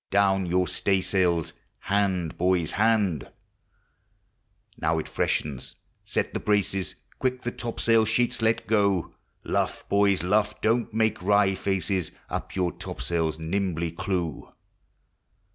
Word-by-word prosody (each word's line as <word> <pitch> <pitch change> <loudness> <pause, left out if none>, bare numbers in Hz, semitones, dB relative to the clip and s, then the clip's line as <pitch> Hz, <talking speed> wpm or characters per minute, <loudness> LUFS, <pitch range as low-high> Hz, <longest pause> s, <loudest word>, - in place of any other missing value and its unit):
Down 95 -1 +3
your 90 +1 +2
stay 95 +1 +1
sails, 90 -4 +1 0.2
hand, 95 -4 0
boys, 90 -3 +1
hand 105 -7 +1 1.5
Now 80 +1 +1
it 80 - -3
freshens, 70 -5 -2 0.3
set - - -2
the - - -1
braces, 100 -2 0 0.2
Quick 130 0 -1
the 120 - -2
topsail 115 -2 +1
sheets 115 +2 +1
let 110 0 +2
go; 100 -5 +1 0.3
Luff, - - -1
boys, 100 -3 +3
luff! 105 +3 +1
don't 115 +2 +1
make 110 -2 +1
wry 100 0 +3
faces, 95 -3 -1 0.2
Up - - -4
your 90 -2 +1
topsails 80 -2 -3
nimbly 85 0 -1
clew. 85 -3 -3
95 Hz, 120 wpm, -26 LUFS, 85-105 Hz, 1.5 s, Down